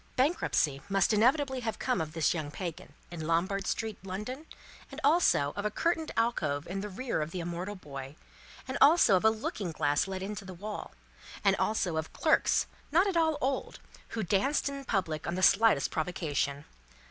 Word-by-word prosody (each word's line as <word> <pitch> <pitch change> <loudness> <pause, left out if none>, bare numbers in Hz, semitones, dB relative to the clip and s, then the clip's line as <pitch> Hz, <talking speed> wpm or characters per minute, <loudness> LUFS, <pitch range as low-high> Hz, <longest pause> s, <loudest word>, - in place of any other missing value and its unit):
Bankruptcy 250 - +1
must 195 +2 +3
inevitably 265 +5 +3
have 225 -3 -3
come 255 -7 0
of 155 -1 -5
this 160 -2 +2
young 155 -4 -3
Pagan, 170 +1 -6 0.2
in 160 -3 -5
Lombard 185 +4 0
street, 220 -2 -2
London, 215 +11 -6 0.4
and - - -7
also 285 - +3
of 205 - -3
a 210 - +1
curtained 325 +7 -1
alcove 155 -11 0
in 195 +3 -4
the 210 - -5
rear 235 -2 -2
of 150 - -2
the 180 - -5
immortal 175 +4 -4
boy, 140 -5 -8 0.5
and 260 +1 -3
also 295 - +7
of 185 - +1
a 220 - +7
looking 215 -4 -3
glass 145 +1 +1
let 190 -1 -4
into 205 +1 -5
the 185 -1 -9
wall, 210 +4 -6 0.5
and - - +4
also 185 -6 0
of 160 0 -4
clerks 315 - +3 0.3
not 345 +6 +5
at 390 -3 -1
all 320 -2 +2
old, 265 0 -2 0.4
who 220 - 0
danced 210 - +1
in 280 -1 -5
public 160 - -1
on 170 - -1
the 185 - -2
slightest 220 -11 +5
provocation. 150 -4 -2
195 Hz, 180 wpm, -30 LUFS, 165-255 Hz, 0.5 s, also